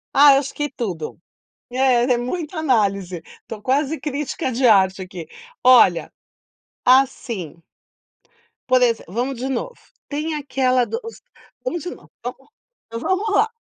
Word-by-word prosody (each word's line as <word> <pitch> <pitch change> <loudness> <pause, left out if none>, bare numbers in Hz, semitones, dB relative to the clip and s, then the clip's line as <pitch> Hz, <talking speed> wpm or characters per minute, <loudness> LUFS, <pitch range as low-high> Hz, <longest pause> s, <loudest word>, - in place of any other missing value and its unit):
Ah, 285 0 +8
eu 270 - +5
acho 275 -1 -5
que 295 -1 -2
tudo, 185 - -5 0.5
é 255 -2 +3
é - - -1
muita 315 +6 -4
análise, 200 - 0 0.2
tô 215 -2 -8
quase 285 +4 0
crítica 285 -2 -3
de 250 +2 +2
arte 190 -3 +4
aqui. 180 -3 -8 0.4
Olha. 245 -9 +5 0.7
Assim. 245 - +1 1.1
Por 255 0 +4
exem 230 -2 +2
Vamos 245 +5 -2
de 265 +2 -3
novo, 475 - -3 0.3
tem 305 +2 -2
aquela 255 -3 +1
do 460 - -4
si - - -15 0.4
vamos 345 -10 -2
de 355 - -4
novo - - -20
vamos - - -8 0.5
vamos 380 +4 0
lá. 440 - +4
255 Hz, 140 wpm, -21 LUFS, 220-295 Hz, 1.1 s, Ah